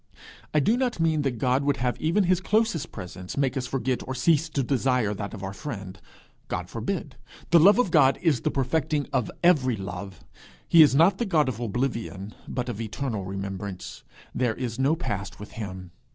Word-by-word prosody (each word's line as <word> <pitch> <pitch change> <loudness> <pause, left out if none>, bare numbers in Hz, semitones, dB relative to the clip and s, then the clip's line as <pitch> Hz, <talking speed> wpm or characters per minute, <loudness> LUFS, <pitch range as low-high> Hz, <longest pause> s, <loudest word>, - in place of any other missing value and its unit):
I 155 - +3
do 215 - +2
not 250 -7 -1
mean 160 -2 +2
that 135 -4 -1
God 130 +3 +1
would 145 0 +1
have 125 0 0
even 170 +6 +2
his 185 0 +2
closest 210 -6 0
presence 90 0 -8
make 135 -2 +1
us 130 -2 -2
forget 130 -1 -1
or 130 - -3
cease 155 +4 +2
to 140 -3 -1
desire 125 -4 +1
that 100 +1 -5
of 100 - -9
our 95 0 -4
friend. 100 - -7 0.5
God - - -4
forbid! - - -4 0.3
The 170 - +7
love 200 +7 +7
of 245 -8 +2
God 135 -4 +5
is 145 -7 +2
the - - 0
perfecting 145 +2 0
of 120 - +1
every 140 -9 +4
love. 95 -1 -7 0.5
He 165 - +7
is 145 -3 +6
not 175 +6 +5
the 235 - 0
God 155 -6 +3
of 120 -4 -3
oblivion, 115 -4 -3
but 125 -1 -3
of 115 -3 -4
eternal 110 -2 -3
remembrance. 95 0 -6 0.3
There 120 -3 0
is 125 -1 -4
no 140 +4 +3
past 105 - -4
with 105 - -9
him. 95 -5 -7
130 Hz, 195 wpm, -26 LUFS, 105-155 Hz, 0.5 s, The